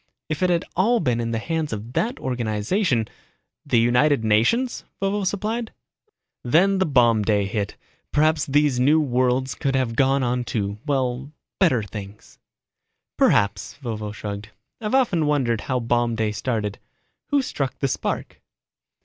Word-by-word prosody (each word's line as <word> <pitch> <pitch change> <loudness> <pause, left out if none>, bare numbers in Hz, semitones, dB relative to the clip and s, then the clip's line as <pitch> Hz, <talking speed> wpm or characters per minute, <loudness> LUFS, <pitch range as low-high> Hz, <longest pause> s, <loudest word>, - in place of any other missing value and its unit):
If 155 +1 -3
it 185 - +3
had 170 -1 +1
all 230 +7 +3
been 125 -6 0
in 115 0 -2
the 115 - -1
hands 160 +5 -2
of 110 +3 -6
that 235 - 0
organization 120 - 0 0.3
..." - - -54
"The - - +3
United 125 +3 +3
Nations?" 115 - +2 0.2
Vovo 195 +1 0
supplied. 215 +4 -2 0.4
"... - - -51 0.3
Then 185 +10 +3
when 190 - +1
Bomb 120 -4 +4
Day 105 -1 +1
hit, 100 0 -3 0.3
perhaps 155 0 +2
these 145 -2 +2
new 145 +5 +4
worlds 130 -2 +1
could 135 -1 -1
have 125 -3 0
gone 135 +1 +3
on 125 0 0
to, 100 -2 -3
well, 135 -1 -1 0.3
better 140 - +3
things." 100 0 -10 0.8
"Perhaps," 100 -1 +2
Vovo 110 -3 -4
shrugged. 105 0 -6 0.3
"I've 215 +3 0
often 185 - +2
wondered 125 -7 +1
how 130 -2 -1
Bomb 120 0 +1
Day 110 -2 0
started. 105 -2 -2 0.5
Who 285 -2 +2
struck 135 - -3
the 135 - 0
spark." - - -3
125 Hz, 155 wpm, -23 LUFS, 115-160 Hz, 0.8 s, Bomb